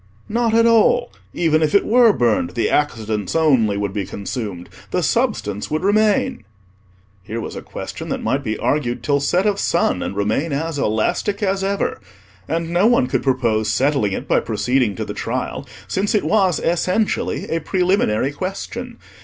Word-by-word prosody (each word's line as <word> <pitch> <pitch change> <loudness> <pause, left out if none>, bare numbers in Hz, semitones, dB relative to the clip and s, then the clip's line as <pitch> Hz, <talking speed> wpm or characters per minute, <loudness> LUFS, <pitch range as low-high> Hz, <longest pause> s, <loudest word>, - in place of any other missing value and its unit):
"Not 230 0 +1
at 230 0 +5
all: 230 +1 +4 0.2
even 160 -2 +1
if 155 +2 +1
it 200 - +4
were 235 0 +5
burned, 110 - 0
the 115 - 0
Accidents 110 - -1
only 130 -11 +3
would 100 -1 -2
be 100 -1 -2
consumed, 100 -2 -5 0.2
the - - -1
Substance 105 - -1
would 155 +1 -2
remain." 205 - +2 0.8
Here 110 +5 -5
was - - -6
a - - -5
question - - -7
that - - -3
might 140 +1 0
be 110 -3 -2
argued 120 -5 -1
till 140 +4 +2
set 175 +7 +1
of 205 -1 +1
sun - - +1
and - - -4
remain 110 +10 0
as 155 +1 -2
elastic 125 - 0
as 195 0 0
ever; 200 +1 -1 0.5
and 165 0 -2
no 180 +5 +3
one 240 - +4
could 130 - -1
propose 115 -5 +1
settling 120 -2 +1
it - - -5
by - - +3
proceeding 125 -5 0
to - - -4
the - - -5
trial, - - -4 0.2
since 205 +4 0
it 210 - +2
was 190 -6 +2
essentially 185 +5 0
a 165 - +1
preliminary 175 - +1
question. 195 - -5
150 Hz, 170 wpm, -20 LUFS, -, 0.8 s, at